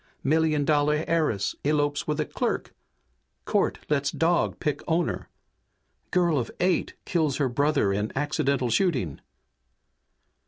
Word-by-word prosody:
Million 155 0 +2
dollar 150 +1 +2
heiress 155 - 0
elopes 145 0 0
with 150 0 -1
a 155 - +1
clerk! - - -2 0.7
Court - - +1
lets 140 -1 +1
dog 170 +3 +1
pick 150 -3 -1
owner! 170 0 -1 0.8
Girl 175 -5 +2
of 120 - -3
eight 180 -1 +1
kills 155 -6 0
her 140 - +1
brother 140 -5 +1
in 105 +2 -1
accidental 140 -3 0
shooting!" 125 - 0
150 Hz, 120 wpm, -26 LUFS, 140-160 Hz, 0.8 s, Million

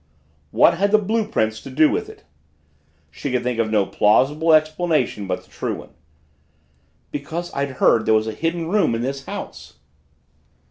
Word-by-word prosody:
"What 170 - +4
had 200 +1 +2
the 215 - +5
blue 215 +1 -1
prints 110 - -1
to - - -10
do 155 +4 +4
with - - -2
it?" - - -14 0.9
She 140 - -5
could 125 -1 0
think 125 -1 -2
of 110 -1 +1
no 105 -3 +2
plausible 145 +13 +2
explanation 155 - +1
but 90 -1 -3
the - - -26
true - - -3
one. - - -12 1.2
"Because 160 +5 -5
I'd 140 -1 -2
heard 115 -3 +2
there 110 - +5
was 110 0 +2
a 110 - -3
Hidden 165 +6 -2
Room 195 - +2
in 115 - -3
this 135 +1 -4
house." 75 -1 -8
140 Hz, 175 wpm, -21 LUFS, 110-165 Hz, 1.2 s, the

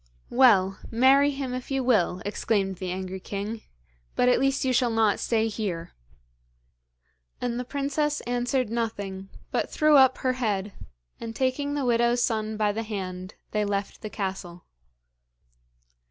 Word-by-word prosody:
'Well, 200 -7 +4
marry 265 +4 +5
him 270 -3 -4
if 255 0 -5
you 270 -1 0
will,' 195 -7 +2
exclaimed 200 -2 -1
the 185 0 -4
angry 185 +1 -4
king; 205 +4 -5 0.5
'but 250 - +3
at 250 - +4
least 270 0 +1
you 260 - +2
shall 245 0 +3
not 225 -3 +2
stay 225 -1 +1
here.' 190 -6 -4 1.5
And 245 -1 -2
the - - -2
princess 285 +3 -1
answered 245 -1 -1
nothing, 200 -5 -3 0.2
but - - -1
threw 305 -2 +4
up 265 -1 +6
her 255 -1 0
head, 205 -5 -2 0.5
and 225 -1 -6
taking 275 +3 -1
the 285 -2 -1
widow's 240 0 +2
son 220 -1 -1
by 210 -1 +2
the 220 +2 -3
hand, 185 -3 -6 0.2
they 210 0 +1
left 200 -1 -3
the 215 - -5
castle. 190 -4 -5
225 Hz, 150 wpm, -26 LUFS, 200-255 Hz, 1.5 s, up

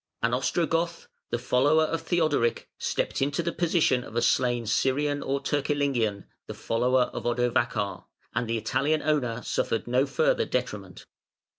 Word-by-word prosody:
An 115 +1 +2
Ostrogoth, 165 +6 0 0.2
the - - -1
follower 135 +6 +3
of 165 +1 -1
Theodoric, 155 -9 +1
stepped - - -1
into 145 +4 0
the 170 - -1
position 165 -8 +2
of 115 - -11
a 120 - +2
slain 120 -2 +2
Scyrian 145 +5 +1
or 140 +1 -1
Turcilingian, 140 -9 0 0.2
the - - -6
follower 125 +2 +1
of - - -5
Odovacar, 120 -4 0 0.3
and 120 0 -1
the 115 0 0
Italian 135 +8 0
owner 125 -6 0
suffered 115 - -1
no 125 +3 +2
further - - +1
detriment. - - -4
130 Hz, 145 wpm, -27 LUFS, 120-155 Hz, 0.3 s, follower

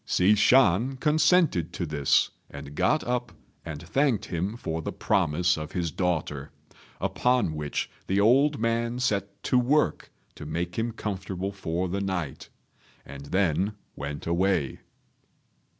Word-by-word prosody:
Hsi 95 +3 +4
Shan 125 +2 +4
consented 150 - +3
to 90 - -3
this, 75 -3 +2 0.2
and 70 0 -9
got 155 - +2
up 120 -3 -2 0.3
and 80 -1 -7
thanked 135 -2 +1
him 95 +6 -3
for 80 -7 -3
the - - -4
promise 85 +4 +1
of 75 -1 -7
his 85 -3 -1
daughter; 80 -6 -2 0.5
upon 125 -9 +1
which 75 -1 -3 0.2
the 95 +1 +1
old 135 +8 +4
man 115 +1 0
set 100 -5 -2
to 125 - +3
work 145 +5 +1 0.2
to 75 - -9
make 85 +3 -3
him 115 +1 -1
comfortable 95 -3 -4
for 90 -2 -2
the 100 +3 -2
night, 90 -7 -4 0.6
and 70 0 -10
then 95 +2 +1 0.2
went 75 +1 -6
away. 85 -4 0
95 Hz, 135 wpm, -27 LUFS, 80-120 Hz, 0.6 s, Hsi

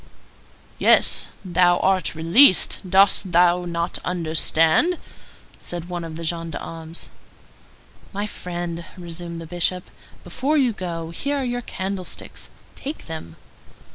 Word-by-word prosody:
"Yes, - - +4 0.2
thou 175 0 +3
art 185 -5 +1
released; 185 - +5
dost 195 0 +4
thou 175 +1 +4
not 170 0 -2
understand?" 165 - +2 0.6
said 175 0 -6
one 175 -1 -4
of 165 -1 -7
the 165 - -6
gendarmes. 165 0 -5 1.0
"My 205 +1 -3
friend," 175 -4 -5
resumed 170 -1 -7
the 165 - -8
Bishop, 175 +2 -1 0.3
"before 295 +4 -1
you 255 -5 +2
go, 165 -4 -5
here 285 - -2
are 275 - -1
your 245 -1 -2
candlesticks. 190 -4 -6 0.3
Take 285 +3 -7
them." 160 - -8
175 Hz, 115 wpm, -22 LUFS, 165-190 Hz, 1.0 s, released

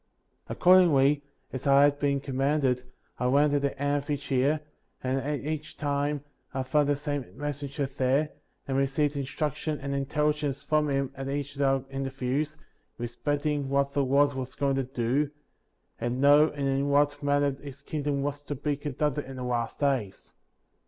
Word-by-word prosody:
54. - - -4
Accordingly, 150 -6 +5 0.3
as 130 +2 -4
I 140 0 +7
had 145 0 +3
been 140 -1 +1
commanded, 135 -1 0 0.3
I 125 - +1
went 145 +3 +4
at 145 - +2
the 140 -1 -2
end 145 0 +1
of 140 - -16
each 145 -1 -3
year, 140 +4 +2 0.4
and 130 +1 0
at 145 +2 -2
each 155 0 -5
time' 145 0 -1 0.3
I 130 - 0
found 145 +2 +2
the 145 - +3
same 145 - -4
messenger 145 0 -3
there, 135 +2 +1 0.4
and 135 -1 0
received 140 +2 +1
instruc 140 +1 -2
tion 155 -2 -3
and 140 0 -4
intelligence 145 0 0
from 150 -1 +1
him 135 -1 0
at 135 0 -5
each 145 0 -3
of 140 - -4
our 135 -1 +2
inter 135 0 -2
views, 135 +4 -2 0.4
respecting 145 +4 -2
what 140 0 +1
the 140 - +2
Lord 140 +2 +3
was 130 -1 -5
going 140 -1 +1
to 135 - +1
do, 130 +3 0 0.7
and 120 +3 -1
how 145 +2 +8
and 145 -3 -2
in 135 +1 +1
what 145 +1 +2
manner 145 0 +2
his 140 0 -10
kingdom 145 -2 -2
was 145 0 -3
to 145 - -3
be 145 +2 -1
conducted 150 0 -2
in 135 - -8
the 130 - -5
last 120 -2 -2
days. 130 -9 -1
140 Hz, 180 wpm, -28 LUFS, 135-145 Hz, 0.7 s, how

